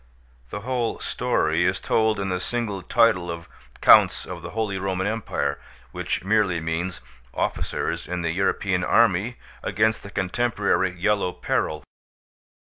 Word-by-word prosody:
The 105 - -5
whole 120 0 -1
story 80 +2 0
is 95 +2 +1
told 110 -2 +1
in 100 -1 -2
the 90 0 -1
single 105 -1 -2
title 90 -3 +3
of 85 0 -6 0.3
Counts - - +6
of - - -7
the - - -7
Holy 105 -3 -2
Roman 95 0 -1
Empire, 100 -9 -2 0.3
which - - -3
merely 100 -4 +2
means 80 +2 -3 0.3
officers - - -2
in 90 0 -3
the 85 - 0
European 95 0 0
army 115 +2 +3 0.2
against 110 +2 +1
the 100 - -10
contemporary 100 0 0
Yellow 100 -1 +1
Peril. 75 -3 -2
95 Hz, 135 wpm, -24 LUFS, 90-110 Hz, 0.3 s, Counts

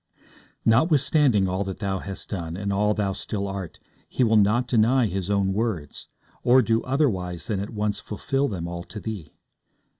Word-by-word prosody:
Notwithstanding 135 - +4
all 95 +2 -1
that 95 -1 -5
thou 95 -3 -2
hast 100 0 -7
done, 85 -3 -4
and 100 0 -2
all 105 +1 +2
thou 100 -2 0
still 100 0 -4
art, 95 -4 -6 0.3
He 130 - +1
will 110 -1 +3
not 110 +4 +3
deny 120 +2 +3
His 95 -2 -3
own 100 -1 +1
words, 100 -9 -3 0.3
or 130 +1 +5
do 115 +1 +2
otherwise 95 - -1
than 105 -3 -2
at 100 - -4
once 105 -1 -2
fulfil 135 +7 -1
them 90 -7 -4
all 85 0 -5
to 105 - -8
thee. 100 -8 -6
105 Hz, 175 wpm, -25 LUFS, 95-115 Hz, 0.3 s, or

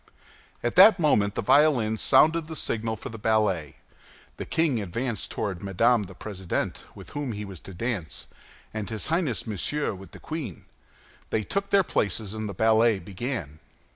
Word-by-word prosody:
At 120 - -1
that 200 +2 +9
moment 105 -11 +3
the - - -1
violins 120 -5 +3
sounded 155 +4 +4
the 160 - -6
signal 115 -5 -1
for 110 - -8
the 115 - -8
ballet. 105 -9 +1 0.6
The - - -6
king 155 -8 +1
advanced 115 +5 -3
toward 95 -5 -3
Madame 115 +5 +3
the 95 0 -12
President, 95 -3 -4
with - - -11
whom 145 -5 -3
he 105 0 -5
was 95 -4 -9
to 95 - -11
dance, 100 -5 -3 0.5
and 110 -2 -4
his 110 -3 -4
Highness 165 - 0
Monsieur 115 +7 -1
with 95 0 -11
the - - -13
queen. 155 -4 -6 0.6
They 110 - 0
took 200 - -2
their 200 -1 +5
places, 105 - -1
and 110 -1 -4
the 100 - -6
ballet 110 0 +4
began. 95 - -5
110 Hz, 170 wpm, -26 LUFS, 100-140 Hz, 0.6 s, that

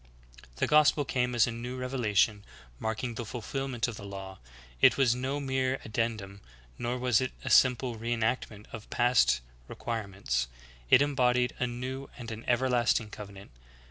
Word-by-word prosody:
"* - - -20
The - - +1
gospel 150 -1 +4
came 125 -1 0
as 120 - +5
a 120 - -3
new 120 +2 -5
reve 125 0 -4
lation, 105 -4 +2 0.4
marking 110 +2 -2
the 120 - -4
fulfilment 125 +2 -3
of 115 -3 -6
the - - -9
law, 95 -1 -8 0.4
it - - +6
was 130 -4 +4
no 130 +3 -2
mere 130 -1 0
addendum, 110 -3 -3 0.4
nor 120 +1 -1
was 125 -2 +2
it 130 - -2
a - - -2
simple 125 -1 +4
re 115 +2 -4
enactment 110 -2 -1
of 110 -2 -8
past 120 - +3 0.3
re - - -8
quirements; 95 - -2 0.4
it 140 - +7
embodied 125 -3 +2
a 125 - +1
new 130 +3 -5
and 115 -2 -7
an 110 +1 -7
everlasting 120 -3 +2
covenant. 100 -2 -10
120 Hz, 170 wpm, -29 LUFS, 110-130 Hz, 0.4 s, it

